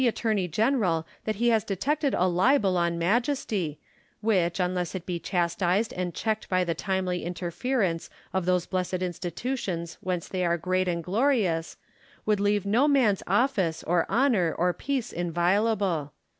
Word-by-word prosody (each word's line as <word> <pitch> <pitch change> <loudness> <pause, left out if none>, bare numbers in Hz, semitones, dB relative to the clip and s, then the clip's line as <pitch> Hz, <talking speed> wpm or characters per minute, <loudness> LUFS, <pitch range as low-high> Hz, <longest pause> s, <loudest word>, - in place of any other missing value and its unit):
attorney 215 -5 0
general 185 - +1 0.2
that 215 - -1
he 240 +4 +2
has 220 -3 +3
detected 280 - 0
a 180 - +2
libel 190 +2 +3
on 170 -1 +1
Majesty, 200 - 0 0.4
which, 185 -5 +1
unless 180 0 -1
it 180 -2 -5
be 175 -2 -3
chastised 180 +4 0
and 180 -1 -3
checked 220 -1 -2
by 185 -1 +2
the 170 -2 -1
timely 185 +1 -2
interference 175 +2 -2 0.2
of 190 -2 -1
those 180 -1 +2
blessed 185 -1 -2
institutions 175 0 -4
whence 180 -2 -2
they 185 -1 -2
are 170 -1 +2
great 185 +2 0
and 170 -1 -1
glorious, 195 - +1 0.5
would 210 -2 +2
leave 205 -1 +1
no 235 +8 +3
man's 250 -9 +3
office, 195 -6 +1
or 170 0 +1
honour, 220 - +2
or 180 +1 +2
peace 265 0 -3
inviolable. 175 -1 +1
185 Hz, 150 wpm, -27 LUFS, 175-220 Hz, 0.5 s, has